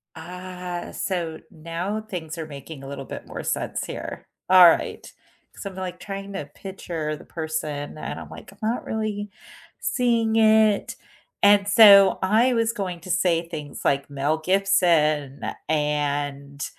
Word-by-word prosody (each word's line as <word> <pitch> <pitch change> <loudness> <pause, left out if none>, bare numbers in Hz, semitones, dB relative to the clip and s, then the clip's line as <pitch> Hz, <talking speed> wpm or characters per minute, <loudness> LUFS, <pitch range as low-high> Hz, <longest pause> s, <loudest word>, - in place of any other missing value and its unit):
Ah, 180 +1 -7
so 170 -4 -3
now 170 +7 -4
things 175 -7 -7
are 160 - -4
making 140 0 -10
a - - -8
little 140 0 -7
bit - - -8
more - - -6
sense - - -2
here. - - -7 0.2
Alright, 180 -3 +5 0.4
so 200 - -6
I'm 190 - -13
like 185 -1 -5
trying 195 +1 -7
to 150 -7 -5
picture 170 -5 -5
the - - -14
person 155 -3 -4
and - - -5
I'm - - -10
like, - - -11
"I'm 200 - -19
not 235 +2 -2
really 215 -2 -3 0.5
seeing 235 -3 +1
it," 220 -2 +4 0.5
and 200 0 +6
so 200 -2 +8
I 225 +7 +3
was 230 -1 +1
going 185 -5 -4
to 185 - -6
say 175 -2 +1
things 150 -4 -7
like, 140 +1 +1
Mel 145 +3 -1
Gibson 160 -6 +2 0.3
and, 145 -2 -1
175 Hz, 145 wpm, -24 LUFS, 150-200 Hz, 0.5 s, so